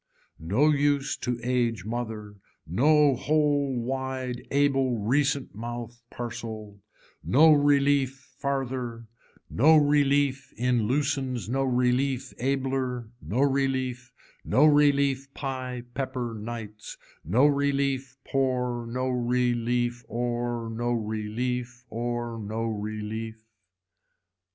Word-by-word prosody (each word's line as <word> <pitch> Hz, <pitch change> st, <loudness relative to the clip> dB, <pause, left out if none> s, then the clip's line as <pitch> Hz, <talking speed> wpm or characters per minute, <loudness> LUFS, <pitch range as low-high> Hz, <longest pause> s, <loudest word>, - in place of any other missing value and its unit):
No 130 Hz, -, +3 dB
use 145 Hz, -1 st, +1 dB
to 125 Hz, -1 st, -3 dB
age 120 Hz, -5 st, 0 dB
mother, 110 Hz, -2 st, -4 dB, 0.3 s
no 145 Hz, -, +4 dB
whole 145 Hz, -1 st, +1 dB
wide 130 Hz, 0 st, -3 dB
able 135 Hz, -3 st, +2 dB
recent 135 Hz, +5 st, 0 dB
mouth 120 Hz, +2 st, -6 dB
parcel, 110 Hz, -4 st, -7 dB, 0.4 s
no 155 Hz, +4 st, +6 dB
relief 140 Hz, -2 st, +2 dB
farther, 130 Hz, -4 st, -3 dB, 0.4 s
no 155 Hz, +7 st, +5 dB
relief 145 Hz, -2 st, +2 dB
in 120 Hz, -2 st, +1 dB
loosens 135 Hz, -2 st, -1 dB
no 135 Hz, +4 st, 0 dB
relief 130 Hz, +1 st, +1 dB
abler, 130 Hz, -2 st, -1 dB
no 120 Hz, +6 st, -1 dB
relief, 130 Hz, -3 st, 0 dB, 0.3 s
no 130 Hz, +8 st, +4 dB
relief 140 Hz, -2 st, +3 dB
pie 130 Hz, -3 st, -4 dB
pepper 130 Hz, -3 st, -3 dB
nights, 110 Hz, -1 st, -7 dB, 0.3 s
no 115 Hz, -, +3 dB
relief 140 Hz, -2 st, +1 dB
poor 125 Hz, -3 st, 0 dB
no 130 Hz, +2 st, -2 dB
relief 120 Hz, -1 st, 0 dB
or, 120 Hz, -1 st, -2 dB
no 120 Hz, +2 st, -1 dB
relief, 120 Hz, +3 st, -3 dB
or 120 Hz, 0 st, -3 dB
no 110 Hz, +2 st, -3 dB
relief. 110 Hz, +1 st, -4 dB
125 Hz, 100 wpm, -27 LUFS, 120-135 Hz, 0.4 s, no